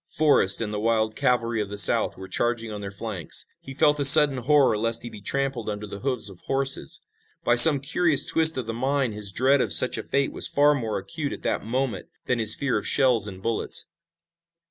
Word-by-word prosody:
Forrest 145 -11 +2
and 105 -2 -5
the 105 - -4
wild 110 0 -1
cavalry 115 -2 -1
of 100 - -6
the 105 - -8
South 100 - +2
were 95 0 -10
charging 115 +3 -3
on 105 -1 -8
their 100 - -7
flanks. 100 -5 -3
He 135 - -12
felt 150 0 +1
a - - 0
sudden 140 0 +8
horror 135 -1 +1
lest 115 +2 -2
he 120 - -9
be 105 - -13
trampled 135 -1 -4
under 105 0 -6
the 100 -1 -10
hoofs 125 -4 -2
of 95 -3 -10
horses. 135 - -1 0.4
By 120 - +1
some 145 +3 +7
curious 150 0 +1
twist 160 -2 +2
of 130 - -4
the 115 - -6
mind 130 0 -2
his 105 -2 -5
dread 130 +7 +1
of - - -3
such 130 - +5
a - - -7
fate 140 0 -2
was - - -2
far 145 +1 +2
more 115 -6 -4
acute 140 +10 -6
at - - -11
that - - -3
moment 130 +3 -4 0.2
than 125 -1 -2
his 110 -1 +4
fear 135 -6 -2
of - - -4
shells 125 -6 +1
and 95 -1 -11
bullets. 115 -1 -1
120 Hz, 220 wpm, -23 LUFS, 105-140 Hz, 0.4 s, sudden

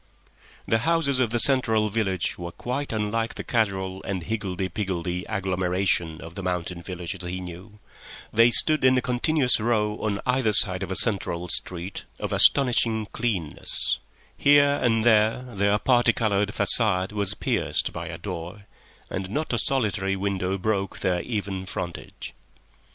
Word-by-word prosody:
The 115 - +2
houses 160 -1 +1
of 125 -3 +2
the 120 - 0
central 110 -4 +3
village 95 -4 -1
were 85 -1 -7
quite 130 +9 -4
unlike 115 +1 -2
the - - -6
casual 95 -5 -1
and 95 -3 -4
higgledy 95 -2 -3
piggledy 90 -2 -3
agglomeration 90 -4 -1
of 80 0 -10
the 100 - -6
mountain 90 -1 -3
villages 90 0 -6
he 90 +1 -4
knew; 90 +4 -10 0.6
they 115 +2 +6
stood 155 +4 +6
in 130 0 +5
a - - +2
continuous 125 +1 +1
row 105 -2 0
on 100 -2 -2
either 125 -4 +1
side 95 -2 +4
of 95 -1 -4
a - - -1
central 90 -6 -1
street 90 +3 -1
of - - -4
astonishing 115 -5 +3
cleanness, 100 -10 0 0.4
here 145 0 +4
and 115 -2 +2
there 110 +1 +3
their 100 +1 +2
parti 120 0 +3
coloured 105 -2 0
facade 105 -5 +1
was 105 -2 0
pierced - - -1
by - - -6
a - - -6
door, 90 +5 -7 0.4
and 95 0 -5
not 150 +6 -2
a 120 - +1
solitary 100 -7 0
window 95 -1 -2
broke 100 0 -2
their 90 -2 0
even 100 -5 -4
frontage. 85 -2 -6
105 Hz, 150 wpm, -25 LUFS, 95-115 Hz, 0.6 s, they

